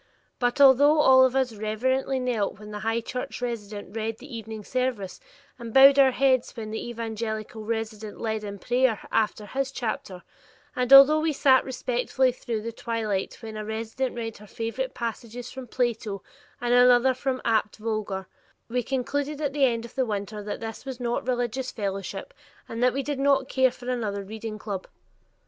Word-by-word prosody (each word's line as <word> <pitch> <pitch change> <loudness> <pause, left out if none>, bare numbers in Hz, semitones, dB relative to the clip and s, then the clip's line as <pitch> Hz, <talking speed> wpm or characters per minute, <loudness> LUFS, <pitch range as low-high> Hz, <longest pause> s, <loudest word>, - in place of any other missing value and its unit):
But 245 +2 0
although 285 +2 +7
all 260 -3 +7
of 260 0 +2
us 260 -3 +1
reverently 260 +5 -1
knelt 235 -6 -1
when 210 +1 -11
the 210 - -5
High 225 +2 0
Church 250 +2 -5
resident 215 -4 -5
read 225 0 -2
the 275 -1 -10
evening 220 -1 -7
service 250 -6 -2 0.4
and 235 -1 -7
bowed 275 +3 +8
our 270 -1 +7
heads 260 -1 +2
when 220 -3 -6
the 220 +2 -4
evangelical 220 -1 -4
resident 220 -1 -4
led 220 -1 -2
in 200 -1 -6
prayer 245 +2 +1
after 215 -1 0
his 265 +4 -2
chapter, 210 -8 -4 0.5
and 250 0 -1
although 275 +3 +10
we 315 0 +1
sat 265 -2 +4
respectfully 255 0 0
through 230 -3 -4
the 230 - -4
twilight 220 -4 -3
when 220 -1 -7
a 215 - -4
resident 225 +4 -3
read 225 -2 -5
her 210 - -13
favorite 230 +5 -4
passages 235 +1 -5
from 260 -1 -8
Plato 225 -5 -2 0.4
and 240 0 0
another 245 +1 +6
from 260 0 -2
Abt 220 -2 +1
Vogler, 210 -4 -3 0.4
we 250 +1 0
concluded 280 +4 -2
at 290 -3 -1
the 285 -2 +4
end 230 -2 0
of 235 - -12
the 265 - +1
winter 210 0 -4
that 205 0 -5
this 225 0 -6
was 265 -2 -6
not 240 0 -2
religious 250 +1 -1
fellowship 200 - -4 0.3
and 230 - -5
that 250 0 +4
we 275 +1 -2
did 285 0 -3
not 275 -1 +3
care 260 -1 +3
for 250 0 -12
another 215 -5 -2
reading 215 +2 -6
club. 200 -3 -5
235 Hz, 180 wpm, -26 LUFS, 215-260 Hz, 0.5 s, although